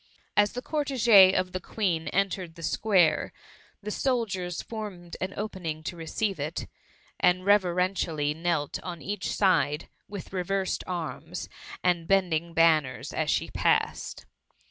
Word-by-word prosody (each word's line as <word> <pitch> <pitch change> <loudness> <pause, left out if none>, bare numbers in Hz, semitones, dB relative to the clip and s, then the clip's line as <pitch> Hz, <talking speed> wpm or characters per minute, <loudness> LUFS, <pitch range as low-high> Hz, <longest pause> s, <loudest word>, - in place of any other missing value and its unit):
As 205 0 +4
the 250 +1 -5
cortege 240 -10 +5
of 185 0 0
the 185 - -3
Queen 175 -4 -1
entered 185 -3 -1
the 165 - -10
square, 185 0 +2 0.5
the 210 - -4
soldiers 210 - -1
formed 200 -6 -7
an 185 +1 -2
opening 180 -7 -4
to 175 - -4
receive 175 +3 -2
it, 150 +4 -3 0.5
and 180 0 +3
reveren 185 -2 +3
tially 150 -5 -1
knelt 165 -3 -1
on 175 -4 -7
each 200 -1 -3
side, 175 -6 +2 0.2
with 200 -2 -8
reversed 190 +1 -1
arms, 175 -3 -5 0.4
and 175 -2 +1
bending 170 -3 +1
banners 160 -5 +3
as - - -1
she - - 0
passed. - - 0
185 Hz, 135 wpm, -27 LUFS, 165-200 Hz, 0.5 s, cortege